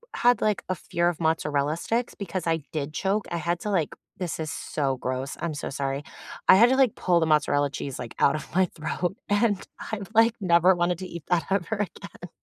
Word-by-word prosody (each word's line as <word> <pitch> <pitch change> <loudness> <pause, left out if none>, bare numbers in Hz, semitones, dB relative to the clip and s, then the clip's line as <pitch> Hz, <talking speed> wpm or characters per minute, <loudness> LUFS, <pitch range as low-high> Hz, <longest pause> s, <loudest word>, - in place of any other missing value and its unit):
had, 245 0 +4
like, 210 -2 0
a 185 - +1
fear 170 +1 0
of 175 - -5
mozzarella 150 -2 +1
sticks 230 +8 -2
because 185 -3 -4
I 165 -3 +1
did 150 -1 -3
choke, 200 +5 0
I 170 - -3
had 170 +1 -1
to, 210 - -3
like- 170 -6 0 0.3
this 175 -4 -3
is 155 -2 -3
so 135 -3 -2
gross, 130 +2 -3
I'm 170 -2 -2
so 145 - -4
sorry- 140 +1 -3 0.4
I - - +9
had 235 +5 +7
to, 265 - +3
like, 260 -5 +4
pull 175 -2 +2
the 160 - +2
mozzarella 150 -2 +2
cheese, 140 -1 -5
like, 120 -2 -7
out 140 - +4
of 155 - -5
my 190 - +5
throat, 175 +6 -3
and 205 -1 +2 0.3
I, 215 - -2
like, 230 +1 +5
never 180 -1 +5
wanted 175 0 0
to 185 - -5
eat 170 -3 -8
that 175 -2 +1
ever 195 +2 0
again. 200 -3 -6
170 Hz, 215 wpm, -26 LUFS, 150-200 Hz, 0.4 s, I